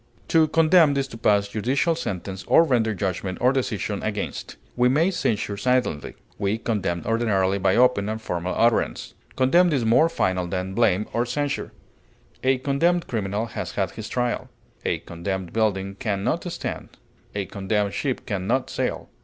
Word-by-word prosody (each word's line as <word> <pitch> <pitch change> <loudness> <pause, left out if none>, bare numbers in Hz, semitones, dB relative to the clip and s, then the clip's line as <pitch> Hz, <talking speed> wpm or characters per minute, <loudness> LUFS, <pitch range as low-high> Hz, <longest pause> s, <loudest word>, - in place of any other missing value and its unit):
To 160 -1 +5
condemn 160 -2 +4
is 135 0 0
to 115 - -9
pass 100 -2 +3
judicial 130 +10 +1
sentence 95 - -5
or 165 - +6
render 115 -8 +1
judgment 95 -1 -3
or 125 +2 +3
decision 110 -6 -2
against. 105 -1 -4 0.2
We 125 0 +4
may 160 +8 +3
censure 105 - -1
silently; 125 -10 0 0.2
we 100 +2 0
condemn 95 -7 -2
ordinarily 100 -4 +1
by 95 - +2
open 120 -5 +3
and 110 0 -3
formal 90 -4 -3
utterance. 115 -1 +1 0.2
Condemn 170 +7 +4
is 135 -6 +1
more 120 +9 +5
final 95 - 0
than 95 +1 -3
blame 105 -2 +2
or 120 - +2
censure; 145 +3 -2 0.7
a 130 0 +3
condemned 165 +7 +1
criminal 105 -1 -2
has 115 - -5
had 95 -2 -1
his 110 -1 -7
trial; 125 -1 -1 0.3
a - - 0
condemned 90 +1 -5
building 100 -3 0
can 100 -1 -2
not - - -1
stand; - - -6 0.4
a 100 -1 -1
condemned 100 +1 -1
ship 135 -4 -2
can 100 -5 -3
not - - 0
sail. - - -2
110 Hz, 160 wpm, -24 LUFS, 100-130 Hz, 0.7 s, or